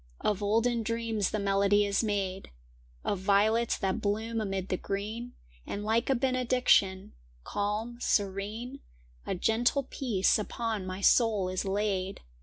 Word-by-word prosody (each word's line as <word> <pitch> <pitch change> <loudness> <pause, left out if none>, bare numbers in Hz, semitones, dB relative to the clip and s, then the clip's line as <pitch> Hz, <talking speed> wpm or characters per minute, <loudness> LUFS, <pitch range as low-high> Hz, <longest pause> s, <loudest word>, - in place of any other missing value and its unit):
Of 210 -1 0
olden 230 +3 +2
dreams 225 -2 -1
the 215 - -2
melody 200 0 +3
is 200 +2 +1
made, 195 -3 -2 0.6
Of 200 - 0
violets 215 +4 +2
that 190 -2 -1
bloom 220 +2 -1
amid 195 -2 -3
the 185 - 0
green; 215 +6 -4 0.3
And 205 - -4
like 225 +4 +1
a 270 - +4
benediction, 250 -7 +2 0.3
calm, 215 - -3
serene, 210 +7 -1 0.5
A - - -1
gentle 235 +8 +1
peace 230 -7 +1
upon 215 -2 -3
my 185 +1 -5
soul 210 -3 +3
is 185 +1 -2
laid. 195 -1 -1
210 Hz, 135 wpm, -29 LUFS, 195-230 Hz, 0.6 s, a